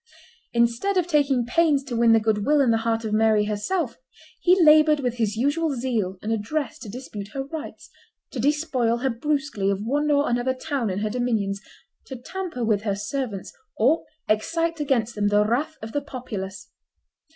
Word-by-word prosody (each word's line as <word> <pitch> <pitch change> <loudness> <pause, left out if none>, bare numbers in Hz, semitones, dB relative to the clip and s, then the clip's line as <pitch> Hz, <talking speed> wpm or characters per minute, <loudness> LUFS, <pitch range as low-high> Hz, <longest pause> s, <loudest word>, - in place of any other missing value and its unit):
Instead 235 +12 +1
of 360 - +3
taking 280 -7 +2
pains 290 +2 +2
to 260 -3 -5
win 230 0 +4
the 225 - +6
good 215 -1 0
will 295 +5 +3
and 255 -5 +4
the - - +3
heart 225 0 -1
of 215 - -2
Mary 215 -1 +3
herself, 215 - -2 0.4
he 365 +2 +4
labored 305 -2 +6
with 245 -3 -2
his 220 -3 0
usual 285 +5 0
zeal 230 -7 -2
and 215 - -2
address 265 +8 -3
to 220 - -9
dispute 215 -3 -7
her 270 - -1
rights, 300 +3 -8 0.4
to 260 - -5
despoil 270 -4 +1
her 265 +2 0
brusquely 275 -5 -1
of 200 +1 -1
one 290 +5 0
or 290 0 +3
another 245 +2 0
town 265 -4 -2
in 185 - -2
her 215 - 0
dominions, 220 -5 -1 0.5
to 265 - -6
tamper 325 -1 -5
with 210 -2 +2
her 205 -2 -1
servants, 205 - -4 0.2
or 275 +9 +3 0.2
excite 330 +10 0
against 245 -6 0
them 205 -1 0
the 205 0 +3
wrath 285 +8 -1
of 220 - -6
the 290 - -1
populace. 195 -8 -7
245 Hz, 185 wpm, -24 LUFS, 215-290 Hz, 0.5 s, the